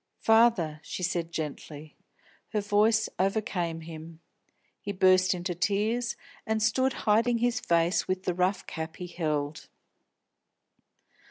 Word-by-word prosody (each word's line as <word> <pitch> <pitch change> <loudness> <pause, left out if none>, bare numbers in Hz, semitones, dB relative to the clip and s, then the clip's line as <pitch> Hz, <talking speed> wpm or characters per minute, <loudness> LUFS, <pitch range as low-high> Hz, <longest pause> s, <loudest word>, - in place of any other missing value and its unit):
"Father," 220 -9 +4
she 180 - -6
said 170 -2 -1
gently. 155 -1 -6 0.6
Her 210 - +1
voice 210 +2 +3
overcame 185 -4 -1
him; 160 0 -10 0.6
he 205 - -4
burst 185 -1 +4
into 180 0 -3
tears 215 +7 0 0.3
and 220 0 -1
stood 260 +3 +2
hiding 230 +3 +3
his 245 +1 +1
face 170 -4 +1
with 185 0 -2
the 180 - 0
rough 185 +2 0
cap 160 0 -6
he 180 - -7
held. 150 -4 -3
185 Hz, 120 wpm, -28 LUFS, 165-220 Hz, 0.6 s, Father